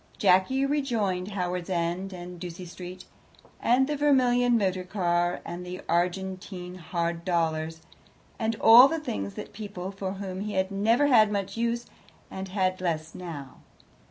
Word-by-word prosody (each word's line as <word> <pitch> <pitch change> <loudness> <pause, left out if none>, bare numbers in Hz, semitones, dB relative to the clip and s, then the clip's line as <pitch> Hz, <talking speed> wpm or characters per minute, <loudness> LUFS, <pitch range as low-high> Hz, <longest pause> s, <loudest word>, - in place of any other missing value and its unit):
Jacky 195 +8 +3
rejoined 230 -11 0
Howards 180 -1 -2
End 175 +2 -1
and 180 -1 -8
Ducie 180 +1 -7
Street, 180 +1 -9 0.6
and 250 +3 +4
the 295 +2 -2
vermilion 250 -4 +3
motor 185 -3 0
car, 175 -2 0
and 175 +1 -6
the 180 +1 -6
Argentine 180 +1 -2
Hard 170 -1 -3
Dollars, 160 -2 -1 0.6
and 225 0 0
all 235 +4 +9
the 325 +2 -2
things 100 - -4
and - - -7
people 200 -3 -6
for 195 -1 -4
whom 190 -1 -5
he 210 0 -4
had 190 +1 0
never 225 +8 +3
had 220 -7 +5
much 200 -2 -2
use 235 +1 -1 0.5
and 190 0 -5
had 185 -1 -1
less 165 -3 -2
now. 155 -7 -8
185 Hz, 150 wpm, -27 LUFS, 175-220 Hz, 0.6 s, all